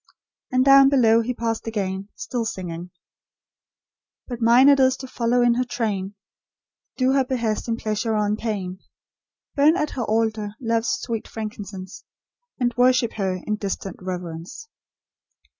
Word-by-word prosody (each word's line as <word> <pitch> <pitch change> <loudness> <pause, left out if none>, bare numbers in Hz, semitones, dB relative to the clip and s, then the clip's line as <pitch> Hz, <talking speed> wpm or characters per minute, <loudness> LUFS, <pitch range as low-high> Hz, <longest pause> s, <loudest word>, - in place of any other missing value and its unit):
And 255 0 +3
down 275 0 +8
below 230 -5 +4
he 235 +2 -2
passed 230 -1 -3
again, 195 -2 -3
still 245 -1 -3
singing: 175 -5 -5 1.4
"But 245 -2 -6
mine 240 +4 +6
it 280 -1 +6
is 260 0 +4
to 260 - -8
follow 245 0 +1
in 240 -1 +4
her 250 +2 +1
train; 210 -6 -3 0.8
Do 255 0 +2
her 270 0 +3
behests 235 -5 -2
in 230 -1 -1
pleasure 215 0 -1
or 210 - +1
in 205 +1 0
pain; 195 -5 -4 0.7
Burn 300 +4 +4
at 305 -4 -1
her 250 - -3
altar 220 -1 -1
love's 230 -2 0
sweet 230 -3 -3
frankincense, 205 -4 -7 0.6
And 240 -1 +1
worship 250 -1 +3
her 190 -3 -1
in 210 0 -1
distant 195 -2 -4
reverence." 180 - -7
225 Hz, 145 wpm, -23 LUFS, 205-250 Hz, 1.4 s, down